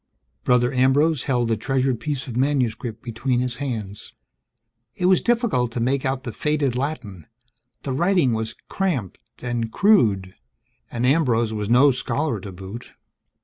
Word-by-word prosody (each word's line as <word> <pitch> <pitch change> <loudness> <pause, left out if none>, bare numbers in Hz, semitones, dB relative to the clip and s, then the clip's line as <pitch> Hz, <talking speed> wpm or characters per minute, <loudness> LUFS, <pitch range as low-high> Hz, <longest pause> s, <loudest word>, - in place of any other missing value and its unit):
Brother 125 - +3
Ambrose 135 +3 +3
held 125 -3 +1
the 115 - +2
treasured 130 +2 0
piece 135 +2 -3
of 125 - -7
manuscript 125 -4 -1
between 120 +2 -1
his 125 -1 -2
hands. 110 -8 -5 0.8
It 180 - -2
was 185 0 +5
difficult 230 - +1
to 120 - -2
make 130 +3 0
out 130 0 -2
the - - -5
faded 150 -4 0
Latin; 125 - -4 0.6
the 135 - -3
writing 170 -4 +2
was 110 0 -3
cramped 155 - -2 0.2
and 120 -2 -2
crude, 105 - +3 0.6
and 120 +1 -2
Ambrose 125 -6 +2
was 105 -1 -3
no 130 +4 +6
scholar 125 0 -2
to 95 +1 -8
boot. 95 +5 -9
125 Hz, 145 wpm, -23 LUFS, 115-140 Hz, 0.8 s, no